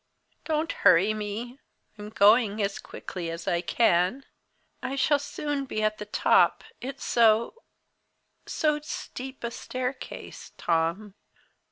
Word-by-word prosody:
"Don't 315 +1 0
hurry 195 +6 +4
me! 215 +5 -5 0.4
I'm 210 0 -8
going 215 +1 +4
as 200 -1 -1
quickly 175 -3 -7
as 165 +1 -6
I 170 -1 +1
can. 185 +5 +2 0.6
I 270 - -3
shall 285 +2 +3
soon 290 -1 -3
be 215 -4 -3
at 215 0 0
the 210 - -6
top! - - +3 0.2
It's 270 +2 -6
so 230 - +3 0.9
so 300 -1 +1
steep 265 -3 -7
a 235 - -2
staircase 255 +2 -6
Tom." 170 +5 0
225 Hz, 125 wpm, -27 LUFS, 200-270 Hz, 0.9 s, hurry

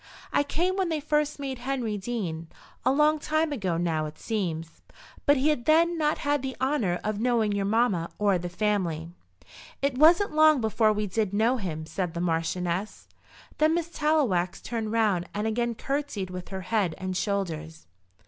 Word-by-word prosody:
"I - - +4
came 350 +6 0
when 375 -3 +1
they 320 -2 0
first 300 0 0
made 270 -3 -5
Henry 250 -4 -2
dean, 190 -7 -4 0.4
a 255 - +3
long 300 +2 +3
time 310 +1 0
ago 190 -11 -1
now 160 -3 0
it 150 - -10
seems. 165 -7 -3 0.5
But 285 0 +6
he 275 +4 +2
had 300 - +2
not 315 +3 +2
then 290 -1 +1
the 265 -1 -5
honour 255 -10 0
of 210 -1 -2
knowing 230 -3 +2
your 200 -1 0
mamma 205 -6 +1
or 200 -3 +2
the 175 +1 -4
family." 175 -5 -1 0.7
"It 275 -2 -1
wasn't 335 +5 +5
long 310 -2 +6
before 220 -1 +2
we 210 0 -1
did 205 0 -1
know 230 +5 +3
him," 160 -7 -4
said 175 0 -3
the - - -2
Marchioness. 175 +3 -2 0.5
Then 310 +2 +4
Miss 340 -1 -2
Tallowax 275 - +1
turned 225 -3 -4
round 210 -6 +1
and 210 +1 -1
again 235 +1 0
curtseyed 275 -9 -3
with 180 -1 -7
her 190 0 -5
head 185 -3 0
and 185 0 -4
shoulders. 165 -6 -3
220 Hz, 175 wpm, -27 LUFS, 180-285 Hz, 0.7 s, But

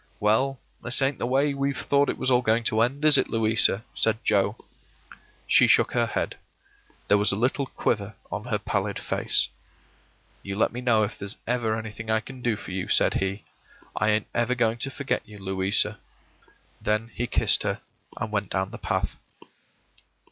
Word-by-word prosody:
“Well, 125 +6 +1 0.2
this 125 +2 +1
ain't 135 0 0
the - - -1
way 140 +3 +2
we've 140 0 -1
thought 140 0 +2
it - - -2
was 130 - 0
all 125 0 +4
going 115 0 +1
to 110 0 +1
end, 135 +6 0
is 150 -3 +7
it, - - 0
Louisa?” 110 -2 +3
said 110 -1 +1
Joe. 100 -1 +2 0.9
She - - +5
shook - - +4
her - - +1
head. - - -3 0.7
There 105 - +4
was 105 - +3
a - - 0
little 130 +5 0
quiver 100 -3 -2 0.2
on 105 +2 -4
her 115 -4 -1
placid 100 0 -2
face. - - +1 0.9
“You 100 0 -5
let 110 - +1
me 125 - -5
know 115 -3 +3
if 105 - -4
there's 100 +1 -2
ever 120 -2 0
anything 110 0 -7
I 110 0 +3
can 130 +3 -11
do 120 -2 0
for - - -9
you,” 95 0 -3
said - - +3
he. 95 +1 -2 0.5
“I 105 - +1
ain't 105 0 +1
ever 120 +1 0
going 115 -1 +1
to 135 - -1
forget 140 +1 -2
you, 105 0 -12
Louisa.” 95 +2 +1 0.8
Then 110 +2 -1
he 120 - -3
kissed - - +3
her, - - -2 0.4
and 110 - -4
went 100 -2 -2
down 95 0 -2
the - - -9
path. - - -2
110 Hz, 185 wpm, -25 LUFS, 105-125 Hz, 0.9 s, is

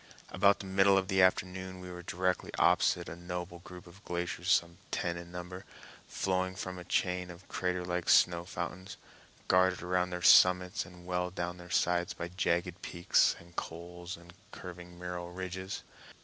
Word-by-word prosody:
About 100 +2 +3
the - - -8
middle 95 +1 +4
of 95 0 0
the 95 -1 +4
afternoon 95 0 +1
we 90 0 -8
were 90 0 -7
directly 90 +1 -1
opposite - - +3
a - - -6
noble 90 0 -6
group 90 +1 -11
of 90 +3 -16
glaciers 90 +1 -2
some 85 0 +2
ten 85 0 -1
in 85 0 -9
number, 90 +1 -7 0.4
flowing 95 -1 -1
from 90 0 -5
a - - -8
chain 90 0 0
of 90 +1 -12
crater 90 -1 -2
like 90 0 -2
snow 85 -1 +5
fountains, 90 +1 -6 0.5
guarded 90 -1 +3
around 90 0 +1
their 90 0 -5
summits 90 +1 +6
and 90 0 -14
well 90 0 -1
down 90 0 -4
their 90 0 -12
sides 90 0 +1
by 85 0 -5
jagged 85 0 -1
peaks 85 0 +2
and 85 0 -17
cols 85 +2 -6
and 85 0 -15 0.2
curving 90 -1 -10
mural 90 0 -5
ridges. 95 +1 -5
90 Hz, 170 wpm, -32 LUFS, 85-95 Hz, 0.5 s, summits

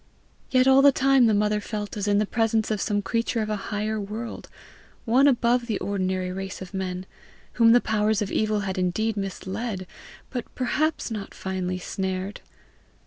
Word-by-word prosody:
Yet 255 0 +4
all 265 0 +7
the 280 0 +7
time 270 -2 +4
the 220 - +3
mother 210 +1 +2
felt 210 -1 -5
as 205 -1 -2
in 205 0 +3
the 210 - +2
presence 225 0 +1
of 215 - -1
some 205 -1 0
creature 230 0 0
of 215 - -3
a - - +1
higher 215 +1 -1
world 215 +4 -6 0.6
one 255 +4 +5
above 240 -2 +2
the 215 -4 0
ordinary 185 -1 -2
race 195 0 -5
of 185 0 -9
men 185 -1 -3 0.5
whom 230 -1 +5
the 240 +1 +6
powers 215 -1 +1
of 205 -2 -2
evil 215 -1 +1
had 190 -1 -3
indeed 210 +5 0
misled, 195 +1 -4 0.5
but 245 -3 -3
perhaps 295 +2 0
not 210 -3 -6
finally 185 -1 -3
snared. 190 +2 -4
210 Hz, 175 wpm, -25 LUFS, 195-230 Hz, 0.6 s, all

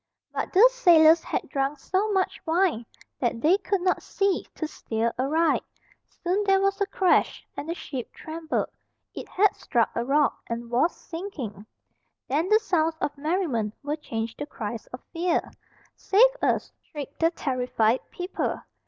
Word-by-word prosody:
But - - -3
the 410 +6 +8
sailors 335 -8 +6
had - - -3
drunk 275 +1 -1
so 385 +8 0
much 380 -2 0
wine 325 - +1 0.3
that 240 -2 0
they 340 +10 +4
could 395 -1 -1
not 365 0 +1
see 395 -2 0
to 315 - -3
steer 230 -5 -2
aright. 315 +5 +2 0.6
Soon 370 +4 +1
there 390 -1 +4
was 395 +1 0
a 400 - +2
crash, 375 -2 +2
and 305 - -6
the 335 - -1
ship 260 -8 -6
trembled. 320 0 -3 0.4
It - - -8
had 405 +1 +3
struck 235 -3 0
a 235 - -1
rock, 285 +3 +2
and 235 0 -5
was 280 +8 +2
sinking. 275 - -7 0.6
Then 315 +7 0
the 430 - +7
sounds 330 -7 0
of 290 - -2
merriment 280 - -1
were 290 +1 -1
changed 225 -6 -5
to 290 - -4
cries 225 -4 -6
of 250 - -10
fear. 340 0 0 0.4
"Save 450 +6 +5
us!" - - +1
shrieked 285 -3 -9
the 330 - +4
terrified 250 -6 0
people. 360 +1 -3
315 Hz, 160 wpm, -26 LUFS, 250-370 Hz, 0.6 s, the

